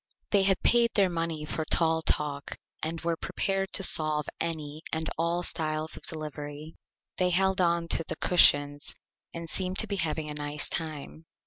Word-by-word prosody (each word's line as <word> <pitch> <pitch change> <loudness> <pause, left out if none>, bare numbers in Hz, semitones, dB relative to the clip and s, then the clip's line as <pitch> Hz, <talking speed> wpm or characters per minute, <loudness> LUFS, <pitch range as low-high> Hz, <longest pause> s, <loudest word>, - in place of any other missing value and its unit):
They 200 - +4
had 195 -1 +1
paid 235 -1 +4
their 195 -4 +3
Money 165 -2 -3
for 160 - -3
Tall 160 +1 +2
Talk 145 -2 -2 0.2
and 165 +1 -3
were 170 0 -1
prepared 195 +3 -2
to 195 - +3
solve 155 -4 +4
any 155 -2 -4
and 160 0 -1
all 170 +2 -1
styles 155 -1 -2
of - - -9
Delivery. 150 0 -6 0.4
They 180 -1 +2
held 190 +1 +2
on 170 -1 +1
to - - +3
the 160 - -3
Cushions 145 -4 +3 0.4
and 170 0 -7
seemed 185 +2 0
to - - +5
be 200 - -2
having 160 -3 -1
a 150 - -2
Nice 145 0 -1
Time. 160 0 -5
160 Hz, 175 wpm, -28 LUFS, 150-175 Hz, 0.4 s, to